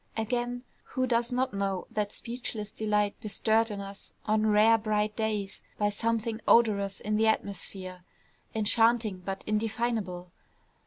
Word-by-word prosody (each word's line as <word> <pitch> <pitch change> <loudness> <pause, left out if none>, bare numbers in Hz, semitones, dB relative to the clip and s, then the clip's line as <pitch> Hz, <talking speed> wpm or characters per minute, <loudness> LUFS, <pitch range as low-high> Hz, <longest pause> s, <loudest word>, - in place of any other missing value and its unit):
Again, 245 +2 -1 0.2
who 255 -1 -1
does 235 -1 +1
not 255 0 0
know 195 -2 -1
that 210 -1 -1
speechless 230 -3 -5
delight 210 -1 0
bestirred 220 +1 +2
in 205 -1 -5
us 195 0 -10
on 215 0 +2
rare 215 +2 +5
bright 210 -1 0
days 210 -3 -2 0.2
by 205 0 +2
something 225 +1 -1
odorous 200 -4 +4
in 210 0 0
the 220 +1 +3
atmosphere, 190 -3 -2 0.5
enchanting, 225 -1 +3
but 190 +1 -5
indefinable? 215 -4 -1
215 Hz, 135 wpm, -29 LUFS, 200-230 Hz, 0.5 s, rare